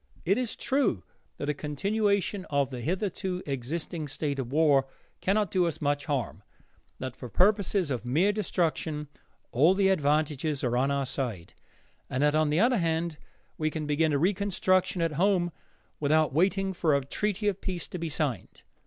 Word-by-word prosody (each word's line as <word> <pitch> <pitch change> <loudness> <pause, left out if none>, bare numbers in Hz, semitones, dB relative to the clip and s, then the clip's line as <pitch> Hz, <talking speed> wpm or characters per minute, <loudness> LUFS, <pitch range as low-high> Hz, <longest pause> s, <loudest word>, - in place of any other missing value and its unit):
It 195 +7 +3
is 250 -3 -2
true 265 - 0 0.3
that 145 - -4
a 150 - +1
continuation 200 +6 0
of 140 -2 +1
the 125 -2 -5
hitherto 185 - -2
existing 150 +4 -3
state 140 0 -3
of 125 -2 -4
war 145 -3 +4 0.3
cannot 205 +1 +1
do 180 -2 +2
us 165 - -3
much 145 -1 -1
more 145 - +3
harm; 120 - -6 0.5
that 130 -2 -5
for 125 - -8
purposes 195 - +2
of 125 -3 -2
mere 155 +12 +2
destruction 160 -7 -1 0.4
all 155 +10 +4
the 195 -1 +3
advantages 150 -3 +1
are 120 -1 +1
on 130 +3 +2
our 140 -1 0
side; 120 -10 -4 0.6
and 130 +3 0
that 150 0 +4
on 155 -1 +3
the 150 +3 +2
other 240 +2 +4
hand 165 -1 -1 0.4
we 155 0 +1
can 155 -1 -4
begin 150 +2 +2
a 145 - +2
reconstruction 185 0 +1
at 165 - +1
home 185 -3 +3 0.5
without 155 0 +2
waiting 190 +4 +2
for 160 -5 +2
a 140 -1 0
treaty 210 +7 -1
of 200 -2 0
peace 180 -3 -4
to 180 - -5
be 165 0 -3
signed. 150 -5 -3
160 Hz, 175 wpm, -28 LUFS, 140-190 Hz, 0.6 s, war